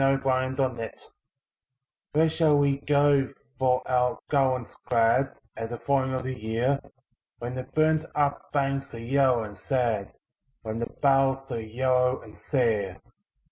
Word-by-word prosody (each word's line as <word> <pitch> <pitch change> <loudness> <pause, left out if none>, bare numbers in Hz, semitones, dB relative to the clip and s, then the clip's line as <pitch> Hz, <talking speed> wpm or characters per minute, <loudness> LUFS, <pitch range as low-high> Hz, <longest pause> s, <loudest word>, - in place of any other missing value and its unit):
A 135 0 +4
Song 130 0 0
of 130 - -9
Autumn 120 -4 -1 1.2
"Where 160 +2 +4
shall 155 -2 +3
we 140 -1 +2
go 145 -2 +3 0.3
for 130 -1 +2
our 125 -1 +2
garlands 130 -4 +1
glad 120 +3 +3 0.2
At 115 0 -5
the 120 - -5
falling 130 0 0
of 130 - -3
the 130 0 -3
year, 120 +4 0 0.6
When 120 +1 -5
the 130 0 -5
burnt 155 +3 +2
up 145 -1 0
banks 135 -2 -1
are - - -7
yellow 130 0 +2
and 105 -1 -8
sad, 115 -2 -1 0.5
When 110 0 -4
the 115 - -2
boughs 135 -1 +2
are 115 - -2
yellow 125 +3 +1
and 105 -1 -14
sere? 110 -9 0
130 Hz, 150 wpm, -27 LUFS, 120-140 Hz, 1.2 s, A